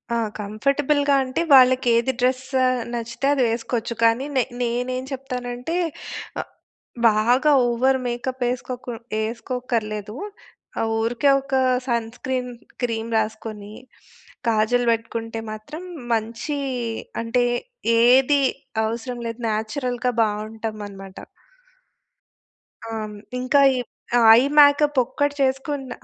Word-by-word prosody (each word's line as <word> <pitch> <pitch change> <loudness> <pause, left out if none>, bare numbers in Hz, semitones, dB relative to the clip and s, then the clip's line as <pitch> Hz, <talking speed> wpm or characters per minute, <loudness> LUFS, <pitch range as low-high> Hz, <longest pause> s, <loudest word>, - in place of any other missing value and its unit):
ఆ! - - +1 0.2
కంఫర్టబుల్‌గా 280 +7 +1
అంటే, 255 +4 -2
వాళ్ళకి 255 -1 +6
ఏది 235 +3 +2
డ్రెస్ 255 +1 +1 0.5
నచ్చితే 235 +2 -3
అది 270 - +2
వేసుకోవచ్చు. 235 0 -2
కానీ, 230 +4 +3
నే 255 - +4 0.2
నేనేం 250 +2 -1
చెప్తానంటే 250 +2 -4 0.7
ఆహ్, - - -13 0.6
బాగా 240 +8 +3 0.2
ఓవర్ 260 +3 +2
మేకప్ 250 +2 -4
వేసుకోకు 250 0 -4 0.3
వేసుకోక్కర్లేదు. 220 -2 -3 0.6
ఆహ్, 225 - 0
ఊరికే 235 +5 +1
ఒక 270 - -10 0.3
సన్ 235 -2 0
స్క్రీన్ 255 -1 -3 0.3
క్రీమ్ 230 -1 -2
రాసుకొని, 215 -1 -4 0.8
కాజల్ 230 +3 +2
పెట్టుకుంటే 225 0 -3
మాత్రం, 285 +11 -8 0.3
మంచి 230 +6 -2 0.6
అంటే 230 +2 +1 0.6
ఏది 265 +4 +5 0.4
అవసరం 240 +2 -4
లేదు. 230 +1 -6
నేచురల్‌గా 245 +3 -1
బావుంటామనమాట. 210 -2 -5 1.7
ఆ! - - -5
హ్మ్, 210 -1 -7 0.2
ఇంకా, 255 +3 +3 0.2
ఈ - - -1 0.4
ఆ - - +3 0.2
ఐ - - +4 0.2
మేకప్ 290 0 +6
ఒక్కటి 285 +4 -1
చేసుకున్న, 270 +1 -1
245 Hz, 105 wpm, -23 LUFS, 225-260 Hz, 1.7 s, వాళ్ళకి